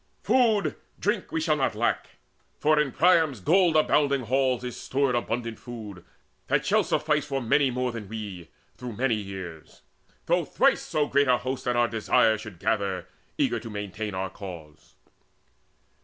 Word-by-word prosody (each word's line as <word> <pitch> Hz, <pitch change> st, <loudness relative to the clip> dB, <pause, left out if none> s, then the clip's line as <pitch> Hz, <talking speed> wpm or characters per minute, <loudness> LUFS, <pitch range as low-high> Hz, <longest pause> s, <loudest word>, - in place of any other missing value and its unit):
Food, 220 Hz, -, +2 dB, 0.2 s
drink, 210 Hz, -1 st, -1 dB
we 165 Hz, -, 0 dB
shall 155 Hz, -1 st, +1 dB
not 130 Hz, -6 st, 0 dB
lack, 120 Hz, +2 st, -1 dB, 0.4 s
For 155 Hz, 0 st, +3 dB
in 150 Hz, -2 st, +2 dB
King -, -, -16 dB
Priam's 160 Hz, -, +4 dB
gold 170 Hz, -, +3 dB
abounding 145 Hz, -3 st, +3 dB
halls 130 Hz, 0 st, +1 dB
Is 125 Hz, -1 st, -5 dB
stored 135 Hz, -1 st, 0 dB
abundant 115 Hz, -1 st, -2 dB
food, 105 Hz, -7 st, -9 dB, 0.4 s
that -, -, +1 dB
shall -, -, +3 dB
suffice 150 Hz, -1 st, +1 dB
For 135 Hz, -2 st, -1 dB
many 135 Hz, +3 st, +2 dB
more 125 Hz, 0 st, -1 dB
than 110 Hz, -4 st, -7 dB
we, 105 Hz, -6 st, -7 dB, 0.3 s
through 125 Hz, -2 st, -6 dB
many 125 Hz, +3 st, +1 dB
years, 95 Hz, -6 st, -7 dB, 0.4 s
Though -, -, +2 dB
thrice -, -, +2 dB
so 150 Hz, -1 st, 0 dB
great 140 Hz, 0 st, +2 dB
a 125 Hz, -1 st, +4 dB
host 130 Hz, +1 st, -4 dB
at 125 Hz, -, +1 dB
our 120 Hz, 0 st, +3 dB
desire 110 Hz, 0 st, +3 dB
Should 105 Hz, -5 st, -9 dB
gather, 100 Hz, -1 st, -1 dB, 0.3 s
eager -, -, +1 dB
to 115 Hz, -, -9 dB
maintain 105 Hz, 0 st, -5 dB
our 95 Hz, -1 st, -3 dB
cause." 85 Hz, -7 st, -11 dB
120 Hz, 165 wpm, -26 LUFS, 105-145 Hz, 0.4 s, Priam's